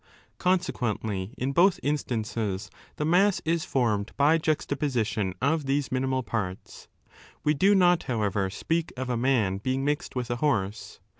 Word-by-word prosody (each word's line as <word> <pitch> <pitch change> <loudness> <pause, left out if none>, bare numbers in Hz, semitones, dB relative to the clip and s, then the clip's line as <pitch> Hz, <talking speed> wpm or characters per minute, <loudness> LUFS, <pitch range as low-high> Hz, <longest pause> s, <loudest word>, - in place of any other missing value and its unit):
Consequently, 115 - -1
in 130 +2 -1
both 175 +6 +4
instances 110 -8 -2 0.2
the 150 - -2
mass 185 +5 +3
is 165 0 0
formed 110 -5 0
by 150 +4 +4
juxtaposition 130 - -1
of 145 0 +1
these 140 0 0
minimal 130 0 0
parts. 100 -6 -5 0.6
We 150 - +3
do 195 +7 +4
not, 180 -2 +4
however, 105 -4 0
speak 165 - -2
of 130 0 -3
a - - +1
20 115 - -2
man 115 -8 +2
being 130 +5 -1
mixed 145 -1 -2
with 125 -1 -2
a 120 - -1
horse. 110 -7 -1
130 Hz, 150 wpm, -27 LUFS, 110-150 Hz, 0.6 s, both